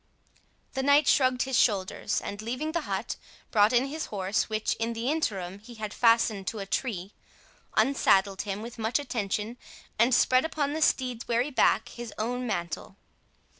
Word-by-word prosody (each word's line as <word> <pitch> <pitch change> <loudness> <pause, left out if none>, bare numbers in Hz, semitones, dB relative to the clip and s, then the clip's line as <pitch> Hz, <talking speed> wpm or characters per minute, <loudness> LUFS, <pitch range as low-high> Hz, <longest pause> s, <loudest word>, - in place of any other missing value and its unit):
The 265 - -1
knight 285 +2 +4
shrugged 255 -2 +3
his 265 -2 +1
shoulders, 205 -1 +1
and 205 +1 -6
leaving 255 +8 -3
the 335 -1 -3
hut, - - -2 0.3
brought 210 -1 +5
in 245 +1 +3
his 310 +3 -4
horse, 195 +2 -1
(which 215 0 0
in 230 +1 -1
the 230 +4 -1
interim 195 - -2
he 235 +3 -13
had 215 -1 -5
fastened 230 -4 +3
to 225 - -2
a 200 - -4
tree,) 195 -3 -3 0.6
unsaddled 195 -8 +3
him 205 +1 -4
with 235 0 -9
much 220 +2 +1
attention, 225 -4 -3 0.4
and 235 +3 +5
spread 255 +1 +4
upon 295 -3 -1
the 315 - -3
steed's 250 -5 +1
weary 240 +5 +1
back 235 -3 +3
his 240 -2 -8
own 245 +3 -2
mantle. 175 -1 -4
230 Hz, 170 wpm, -28 LUFS, 205-255 Hz, 0.6 s, brought